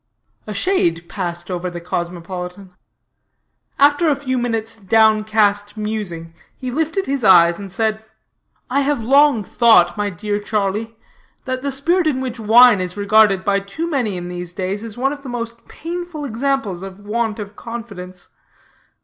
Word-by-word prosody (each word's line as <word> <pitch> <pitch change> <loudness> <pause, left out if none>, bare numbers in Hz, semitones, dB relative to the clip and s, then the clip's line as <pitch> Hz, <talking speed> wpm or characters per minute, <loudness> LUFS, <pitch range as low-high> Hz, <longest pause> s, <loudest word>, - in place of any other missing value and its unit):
A 210 - -4
shade 175 - 0
passed 175 -2 -5
over 180 0 -3
the 175 0 -7
cosmopolitan. 180 +2 -5 1.0
After 290 +4 +4
a 290 - +3
few 265 -2 -3
minutes' 225 -2 -2
down 220 +1 +3
cast 205 -1 +1
musing, 200 -7 -4 0.2
he 255 -1 -5
lifted 320 +7 -1
his 275 -2 -2
eyes 175 -3 +6
and 200 -2 -8
said: 220 +2 -1 0.6
"I 265 +3 +1
have 280 -4 0
long 275 -2 +4
thought, 215 -5 +4
my 205 0 0
dear 205 +3 -3
Charlie, 210 +2 -2 0.5
that 255 0 -3
the 280 +1 -2
spirit 325 +6 +1
in 275 -4 0
which 255 -2 -4
wine 225 -1 +6
is 180 +1 -5
regarded 205 -2 +4
by 200 -1 +2
too 200 +13 -5
many 245 - -1
in 175 0 -6
these 180 -1 -6
days 195 +3 -3
is 225 -1 -8
one 270 +3 0
of 290 - -9
the 275 - -8
most 235 -1 -6
painful 340 -2 -6
examples 245 -6 -1
of 195 +1 -9
want 220 0 -1
of 205 -1 -8
confidence. 200 -7 -8
215 Hz, 160 wpm, -19 LUFS, 190-255 Hz, 1.0 s, eyes